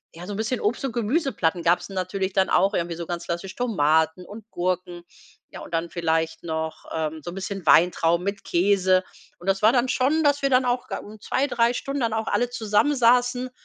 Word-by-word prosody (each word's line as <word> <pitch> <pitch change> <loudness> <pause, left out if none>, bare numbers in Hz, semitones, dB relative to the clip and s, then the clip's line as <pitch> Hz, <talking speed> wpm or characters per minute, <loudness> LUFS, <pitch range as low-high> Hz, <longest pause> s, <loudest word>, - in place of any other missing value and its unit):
ja, 170 +2 -9
so 205 - -6
'n - - -5
bisschen 225 +3 -1
Obst 215 +6 -1
und 270 - -1
Gemüseplatten 230 - 0
gab's 170 +1 +2
natürlich 190 0 -3
dann 190 -1 +2
auch 195 +2 +3
irgendwie 170 -3 -2
so 170 - -6
ganz 170 0 -5
klassisch 175 +3 -4
Tomaten 160 -6 +1
und 215 +3 -12
Gurken, 180 -1 -3 0.5
ja, - - -9
und - - -10
dann 165 0 -2
vielleicht 165 -1 -1
noch, 160 -1 -4
ähm, 160 0 -3
so - - -6
'n 175 - -8
bisschen 195 -1 -5
Weintrauben 170 0 +4
mit 200 0 -3
Käse 185 0 +2 0.3
und 175 - -14
das 195 0 +1
war 215 +1 +6
dann 245 0 +2
schon, 280 +6 +1
dass 290 -1 +2
wir 275 - +1
dann 255 0 +3
auch 245 0 -1
da - - -3
un 215 +1 -12
2, 265 +6 0
3 235 -3 +1
Stunden 275 +2 -3
dann 230 -2 0
auch 220 0 -1
alle 245 +1 0
zusammen 225 +5 +1
saßen, 245 +1 +2
195 Hz, 215 wpm, -24 LUFS, 170-245 Hz, 0.5 s, war